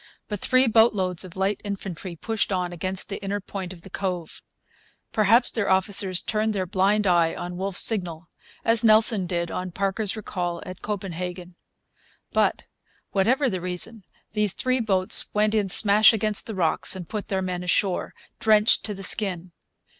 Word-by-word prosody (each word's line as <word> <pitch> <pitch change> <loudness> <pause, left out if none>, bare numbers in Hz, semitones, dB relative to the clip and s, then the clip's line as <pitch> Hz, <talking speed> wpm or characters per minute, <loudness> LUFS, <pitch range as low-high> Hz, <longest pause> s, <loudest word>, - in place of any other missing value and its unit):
But 210 -2 -5
three 255 +4 +3
boatloads 210 -6 +2
of 185 -2 -12
light 195 +2 -1
infantry 190 -3 -6
pushed 220 +4 -2
on 180 -2 -2
against 185 +2 -3
the 200 - -6
inner 200 +1 -2
point 190 -2 -7
of 175 -2 -12
the 195 - -11
cove. 180 -4 -4 0.7
Perhaps 225 +3 +3
their 215 -4 -1
officers 190 -1 +2
turned 215 0 -1
their 190 -2 -2
blind 200 +3 +1
eye 170 -3 +2
on 175 0 -6
Wolfe's 190 +1 +2
signal, 180 -6 0 0.4
as 230 0 +2
Nelson 215 -3 +4
did 170 -1 -3
on 185 0 -4
Parker's 195 +3 -2
recall 175 -5 -4
at 185 0 -9
Copenhagen. 180 -3 -5 0.8
But, - - 0 0.5
whatever 245 +8 +1
the 185 -7 -3
reason, 180 +4 -2 0.3
these 210 -3 0
three 255 0 0
boats 190 -5 +3
went 210 +1 +2
in 210 -3 0
smash 210 +3 +6
against 215 -1 0
the 220 - -5
rocks 170 0 +2
and 180 -3 -8
put 210 -2 -5
their 190 -1 -2
men 180 -1 -4
ashore, 180 +1 -1 0.2
drenched 215 0 +3
to 210 - -3
the 195 - -9
skin. 185 -3 0
195 Hz, 165 wpm, -24 LUFS, 180-215 Hz, 0.8 s, smash